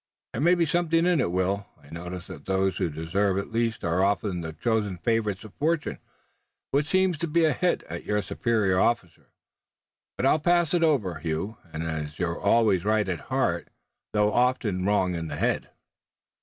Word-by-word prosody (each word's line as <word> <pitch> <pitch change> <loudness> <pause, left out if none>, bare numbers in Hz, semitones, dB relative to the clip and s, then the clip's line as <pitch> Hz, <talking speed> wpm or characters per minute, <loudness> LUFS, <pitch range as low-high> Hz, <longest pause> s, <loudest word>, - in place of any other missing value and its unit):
"There - - -2
may 175 +4 +5
be 170 -1 +2
something 165 +1 +2
in 175 -5 +3
it, 85 - 0
Will. 95 +2 0
I 70 - -18
notice 90 +2 -6
that - - -10
those 95 -1 +1
who - - 0
deserve 90 +6 0
it 100 - -3
least 115 -1 -1
are 85 +2 +1
often 100 -2 0
the 80 -1 -5
chosen 105 +1 -1
favorites 105 -1 0
of 110 - -12
fortune." 160 +1 -1 0.7
"Which 145 +1 +1
seems 185 -3 +2
to 170 - -1
be 165 +1 +3
a 155 - +3
hit 180 +6 0
at 85 +1 -7
your 105 -1 0
superior 105 -4 +1
officer, 95 -9 0 0.9
but - - 0
I'll 150 - +4
pass 175 0 +2
it 175 -1 +3
over, 120 - +1
Hugh, 85 +7 -3
as 80 -1 -4
you're 85 -2 -2
always 100 -4 +3
right 105 -1 +2
at 90 -3 -2
heart - - 0 0.4
though 105 0 +2
often 120 -7 +1
wrong 95 -3 +2
in 85 -1 -3
the - - -5
head." - - 0
105 Hz, 185 wpm, -26 LUFS, 90-140 Hz, 0.9 s, may